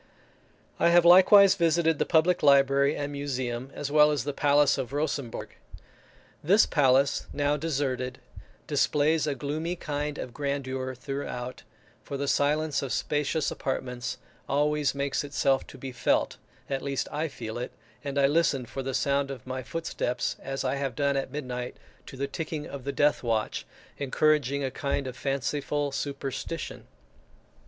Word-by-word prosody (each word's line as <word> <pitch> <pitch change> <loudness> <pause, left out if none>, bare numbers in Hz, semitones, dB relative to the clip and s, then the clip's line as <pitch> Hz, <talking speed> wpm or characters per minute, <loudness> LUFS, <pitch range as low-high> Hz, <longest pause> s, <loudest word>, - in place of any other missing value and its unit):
I - - +5
have 170 0 +5
likewise 190 +2 +8
visited 165 -2 +2
the - - +1
public 170 +3 +3
library 140 0 +4
and 145 0 -3
museum, 130 -3 -3
as 145 -1 -4
well 150 0 +6
as 150 -2 0
the 145 - -3
palace 145 0 +3
of 125 +1 -4
Rosembourg. 140 -5 -2 0.9
This 195 +8 +5
palace, 135 -1 +3
now 145 0 +1
deserted, 130 -5 -2 0.5
displays 150 +2 +2
a 145 - 0
gloomy 155 +6 -3
kind 150 -3 -3
of 125 - -6
grandeur 130 -2 -3
throughout, 125 -2 -5 0.4
for 140 - -6
the 140 +1 -2
silence 150 +2 +1
of 135 -3 -4
spacious 150 +1 0
apartments 125 -2 -3 0.3
always 150 0 +1
makes 140 0 -1
itself 140 -1 +1
to - - -12
be 135 - -6
felt; 125 - +1 0.3
I - - -4
at 135 - -1
least 140 -1 -2 0.2
feel 120 -3 -6
it, 125 - -4 0.3
and 140 -1 -4
I 140 - +5
listen 140 -3 +2
for 135 +3 -6
the 135 0 -3
sound 140 +1 +1
of 135 -4 -7
my 130 0 -4
footsteps 130 -4 -2
as 135 0 -4
I 135 +1 0
have 135 -3 -3
done 140 -1 +1
at 135 -1 -2
midnight 125 -4 -5 0.3
to 135 - -9
the 140 - -1
ticking 155 +1 -4
of 135 -2 -8
the 140 - -1
death 145 +1 +2
watch, 115 -3 -1 0.3
encouraging 140 0 +1
a 135 - -1
kind 140 0 -2
of 130 -1 -5
fanciful 145 +2 -1
superstition. 140 -1 -5
140 Hz, 155 wpm, -27 LUFS, 130-150 Hz, 0.9 s, likewise